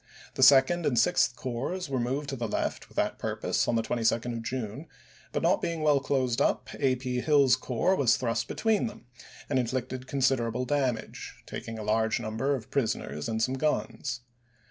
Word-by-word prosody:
The - - -4
Sec 135 +1 +7
ond 175 0 -2
and 125 - +1
Sixth 125 -1 +3
Corps 130 +10 -3
were 135 -2 -1
moved 135 +4 -2
to 135 - -3
the 120 -2 -3
left - - -3
with - - -20
that - - 0
purpose - - -1
on 120 - +1
the 115 - +1
22d 115 +1 0
of 115 - -4
June; 125 +4 -5 0.4
but, - - -2
not - - +3
being 165 -1 -2
i«54 - - -2
well 150 -2 +4
closed 130 -2 0
up, - - +1
A. 135 -2 +3
P. 125 -1 -3
Hill's 140 -4 +5
corps 130 +8 0
was 130 -8 +3
thrust 115 -2 -1
be - - -6
tween 220 0 +1
them, 205 - -10 0.4
and 130 - +1
inflicted 130 +1 -3
considerable 125 -3 +1
damage, 130 -5 -2
taking 115 0 -6
a 110 - -5
large 110 +2 +1
number 120 +5 -1
of 115 -5 -8
prisoners 110 - -2
and 110 0 0
some 130 +2 -1
guns. 135 -4 -1
130 Hz, 195 wpm, -28 LUFS, 115-140 Hz, 0.4 s, Sec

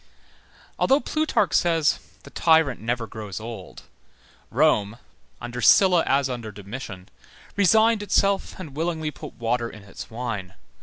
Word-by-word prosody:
Although 275 +2 +3
Plutarch 310 0 0
says: 165 -3 +2 0.2
the - - -13
tyrant 160 -8 +3
never 120 +1 -2
grows 110 -4 -7
old, 110 -4 -9 0.7
Rome, 115 -6 +2 0.4
under 120 0 -6
Sylla 180 +2 +6
as 135 0 +2
under 120 -4 -5
Domitian, 100 -2 -8 0.5
resigned 220 +3 +4
itself 200 -1 +1
and 155 -7 -9
willingly 160 -1 -2
put - - -10
water 115 0 -1
in 110 - -12
its 100 - -10
wine. 110 -6 -5
125 Hz, 130 wpm, -24 LUFS, 110-170 Hz, 0.7 s, Sylla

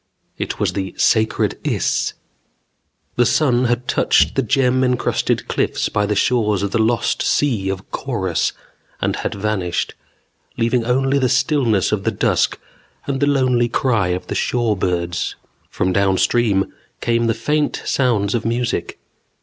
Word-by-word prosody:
It - - -4
was - - 0
the 95 -1 -4
Sacred 110 -1 +1
Iss. - - 0 1.0
The 120 - +4
sun 130 -5 +2
had 120 +1 -1
touched - - +3
the 135 - +1
gem 130 0 +2
encrusted 125 -1 0
cliffs - - -1
by 105 0 0
the 105 - 0
shores 105 -3 +1
of 100 - -2
the 115 - 0
Lost 115 +1 +1
Sea 115 -10 +1
of 95 +1 -5
Korus 95 -10 -1 0.5
and - - -1
had - - -3
vanished, 100 -4 -2 0.6
leaving 115 +1 +1
only 135 +3 +2
the 130 -2 +1
stillness 125 - +2
of 105 -2 -1
the - - +1
dusk - - 0 0.5
and 135 -1 -2
the 145 - +2
lonely 130 -4 +2
cry 115 -6 +1
of 90 +1 -2
shore 120 -3 0
birds. 90 -2 -2 0.3
From 95 0 -1
downstream 100 +2 +2 0.3
came 115 0 +1
the 115 - +1
faint 150 +6 -1
sounds 115 -7 +1
of 120 -2 -1
music. 115 -6 -2
115 Hz, 145 wpm, -19 LUFS, 100-125 Hz, 1.0 s, The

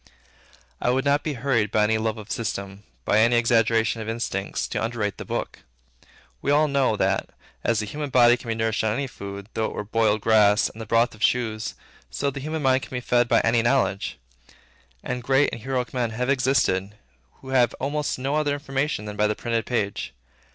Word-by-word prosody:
I - - +1
would 130 +2 +1
not 140 +1 +3
be 155 - -3
hurried 120 -5 0
by 105 - +2
any 110 +1 +2
love 110 0 -1
of 105 0 -9
system, 100 -3 -4 0.2
by 105 - +3
any 115 +2 +4
exaggeration 115 -1 +2
of 110 - -5
instincts, 115 -4 -3
to 110 -1 -2
underrate 110 -3 -2
the - - -6
Book. - - -4 0.8
We - - -2
all 150 +2 +4
know, 140 -5 +2
that, 95 0 0 0.3
as 115 -1 +1
the - - -3
human 145 +7 -5
body 120 -2 +6
can 120 - -12
be 115 - -1
nourished 110 -1 0
on 110 -1 +1
any 140 - -1
food, 100 -5 -8
though 110 - 0
it - - -4
were - - -4
boiled 110 0 +1
grass 105 -1 +4
and 115 - -11
the 110 - -7
broth 115 +2 +2
of 105 - -16
shoes, 110 -3 0 0.3
so 140 0 -1
the 140 - -6
human 155 +2 -4
mind 130 0 +3
can - - -9
be - - -1
fed 120 -1 +2
by - - +4
any 115 0 +3
knowledge. 120 -5 0 0.9
And 125 0 -3
great 135 +3 +2
and 115 - -7
heroic 130 -1 -2
men 125 -2 0
have 125 +4 -1
existed, 125 -8 +1 0.4
who 130 - -13
had 125 -2 +3
almost 145 +2 -2
no 135 +2 -2
other 150 -2 +1
information 135 -4 -2
than 105 0 -6
by 105 +1 +3
the 105 - -1
printed 115 0 -2
page. 100 - -2
115 Hz, 205 wpm, -24 LUFS, 110-130 Hz, 0.9 s, body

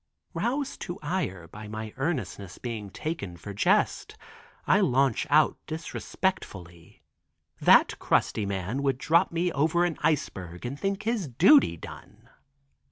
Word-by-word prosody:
Roused 275 +3 -2
to 175 0 -5
ire 145 - -3
at 105 0 -9
my 110 0 -6
earnestness 130 - -3
being 110 -5 -5
taken 100 - -5
for 100 +4 -8
jest, 100 - +1 0.5
I - - +4
launch 130 -1 +2
out 150 +1 +4
disrespectfully, 130 - -5 0.6
"That - - +5
crusty 105 -2 +1
man 100 +7 -3
would 135 -2 +1
drop 170 +7 +2
me 170 +1 0
over 160 +4 +2
an 170 -3 -3
iceberg 90 - -2
and 135 +4 -5
think 195 +1 -2
his 220 -6 -1
duty 165 - +5
done." - - -12
135 Hz, 130 wpm, -27 LUFS, -, 0.6 s, That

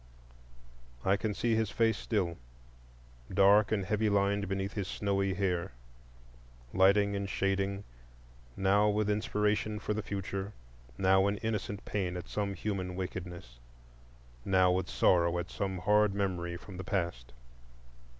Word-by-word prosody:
I 95 - +4
can 105 0 -2
see 120 -1 +1
his 110 -2 +1
face 115 -1 +2
still, 95 - -2 0.9
dark 100 +2 +5
and 100 -3 0
heavy 105 +2 +1
lined 100 0 +1
beneath 95 +1 -2
his 100 -3 -3
snowy 100 -2 -1
hair; 90 -1 -1 1.0
lighting 100 +2 +4
and 100 0 -3
shading, 100 +1 -1 0.7
now 100 +2 +3
with 105 0 +1
inspiration 105 0 0
for 105 0 -2
the 110 - -2
future, 100 0 -4 0.4
now 95 +1 +4
in 100 0 0
innocent 105 -3 -3
pain 90 -4 -2
at 90 - -7
some 100 -2 -2
human 95 -4 -3
wickedness, 90 -9 -6 0.8
now 95 -1 +4
with 90 0 -1
sorrow 85 -1 +3
at 85 +1 -4
some 95 -1 -2
hard 105 +2 +3
memory 90 -3 -2
from 95 +1 -11
the 95 - -5
past. 85 -11 -3
100 Hz, 135 wpm, -31 LUFS, 95-105 Hz, 1.0 s, dark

